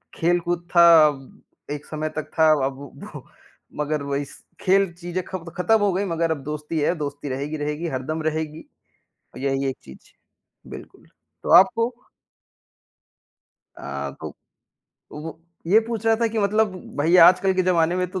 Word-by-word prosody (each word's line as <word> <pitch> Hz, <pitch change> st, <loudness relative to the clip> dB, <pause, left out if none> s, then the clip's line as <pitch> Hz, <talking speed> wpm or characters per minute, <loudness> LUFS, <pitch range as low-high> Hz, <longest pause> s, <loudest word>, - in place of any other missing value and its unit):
खेल-कूद 175 Hz, 0 st, 0 dB
था 170 Hz, 0 st, +8 dB, 0.2 s
अब, 135 Hz, -3 st, -7 dB, 0.3 s
एक 145 Hz, 0 st, -5 dB
समय 155 Hz, 0 st, -4 dB
तक 155 Hz, -, -4 dB
था 160 Hz, 0 st, +6 dB, 0.2 s
अब 135 Hz, 0 st, -4 dB, 0.4 s
वो -, -, -10 dB, 0.6 s
मगर 150 Hz, 0 st, -2 dB
वही 140 Hz, 0 st, -2 dB
स -, -, -15 dB, 0.2 s
खेल 195 Hz, -1 st, +2 dB
चीज़ें 175 Hz, +1 st, -5 dB
खब 180 Hz, -3 st, -7 dB
खत्म 220 Hz, +5 st, +3 dB
हो 205 Hz, -1 st, +2 dB
गई 200 Hz, +2 st, -1 dB
मगर 165 Hz, -2 st, -1 dB
अब 145 Hz, -4 st, -3 dB
दोस्ती 150 Hz, +2 st, -4 dB
है, 170 Hz, +4 st, +1 dB
दोस्ती 145 Hz, -2 st, -5 dB
रहेगी 140 Hz, +4 st, -4 dB
रहेगी, 150 Hz, +3 st, -3 dB
हरदम 155 Hz, +4 st, -4 dB
रहेगी। 155 Hz, 0 st, -3 dB, 0.8 s
यही 135 Hz, 0 st, -1 dB
एक -, -, -8 dB
चीज़, 65 Hz, -, -15 dB, 0.6 s
बिल्कुल, -, -, -12 dB, 0.4 s
तो -, -, -4 dB
आपको 230 Hz, +6 st, +4 dB, 1.9 s
अ, 70 Hz, 0 st, -5 dB
तो -, -, -5 dB
अ, -, -, -18 dB, 0.8 s
वो 160 Hz, +2 st, -8 dB, 0.3 s
ये 210 Hz, +6 st, +5 dB
पूछ 230 Hz, -1 st, -4 dB
रहा 225 Hz, -, +5 dB
था 230 Hz, 0 st, +1 dB
कि 220 Hz, 0 st, -3 dB
मतलब 210 Hz, 0 st, +1 dB, 0.2 s
भई 165 Hz, +5 st, +3 dB
आजकल 185 Hz, +1 st, +2 dB
के 185 Hz, -, +2 dB
जमाने 175 Hz, -1 st, +2 dB
में 180 Hz, 0 st, 0 dB
तो 185 Hz, -, -4 dB
165 Hz, 160 wpm, -23 LUFS, 150-185 Hz, 1.9 s, था